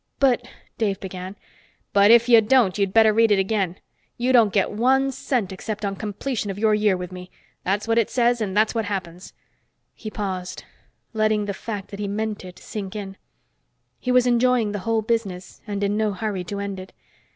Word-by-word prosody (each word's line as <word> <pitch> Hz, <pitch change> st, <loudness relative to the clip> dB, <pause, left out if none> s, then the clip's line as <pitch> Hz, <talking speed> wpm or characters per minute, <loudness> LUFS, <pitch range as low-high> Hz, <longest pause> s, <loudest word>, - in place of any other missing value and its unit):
"But 250 Hz, -3 st, +2 dB, 0.2 s
" -, -, -37 dB
Dave 205 Hz, -4 st, 0 dB
began. 185 Hz, 0 st, -7 dB, 0.6 s
"But 200 Hz, +1 st, +5 dB
if 235 Hz, +1 st, +6 dB
you 230 Hz, -2 st, +7 dB
don't, 220 Hz, -4 st, +3 dB
you'd 200 Hz, -2 st, 0 dB
better 220 Hz, 0 st, +5 dB
read 225 Hz, +1 st, +4 dB
it 205 Hz, -, +5 dB
again. 195 Hz, -2 st, 0 dB, 0.4 s
You 250 Hz, +2 st, +1 dB
don't 225 Hz, -5 st, +5 dB
get 195 Hz, -1 st, +1 dB
one 265 Hz, +5 st, +2 dB
cent 240 Hz, -6 st, -2 dB
except 210 Hz, +2 st, -5 dB
on 195 Hz, 0 st, -2 dB
completion 215 Hz, +2 st, -4 dB
of 195 Hz, -, -4 dB
your 215 Hz, 0 st, +2 dB
year 210 Hz, -3 st, +2 dB
with 180 Hz, 0 st, -6 dB
me. 180 Hz, 0 st, -9 dB, 0.3 s
That's 200 Hz, +4 st, -1 dB
what 230 Hz, 0 st, +3 dB
it 225 Hz, -, +1 dB
says, 240 Hz, -1 st, +2 dB
and 205 Hz, -2 st, -2 dB
that's 215 Hz, 0 st, +3 dB
what 225 Hz, -2 st, -1 dB
happens." 185 Hz, -3 st, -5 dB, 0.6 s
He 215 Hz, -, -8 dB
paused, 190 Hz, -4 st, -5 dB, 0.5 s
letting 215 Hz, -1 st, +1 dB
the 200 Hz, -, -3 dB
fact 205 Hz, -1 st, -6 dB
that 200 Hz, -, -8 dB
he 205 Hz, -, -2 dB
meant 210 Hz, +1 st, -3 dB
it 180 Hz, -1 st, -11 dB
sink 205 Hz, -2 st, -7 dB
in. 195 Hz, -2 st, -6 dB, 0.8 s
He 250 Hz, -, -2 dB
was 250 Hz, 0 st, +4 dB
enjoying 245 Hz, -2 st, +2 dB
the 205 Hz, -, -3 dB
whole 225 Hz, -1 st, +1 dB
business, 205 Hz, -5 st, -3 dB
and 205 Hz, -1 st, -3 dB
in 200 Hz, +1 st, 0 dB
no 215 Hz, -2 st, 0 dB
hurry 200 Hz, -2 st, -3 dB
to 200 Hz, +3 st, -5 dB
end 200 Hz, -1 st, -4 dB
it. 185 Hz, 0 st, -11 dB
210 Hz, 200 wpm, -23 LUFS, 195-230 Hz, 0.8 s, you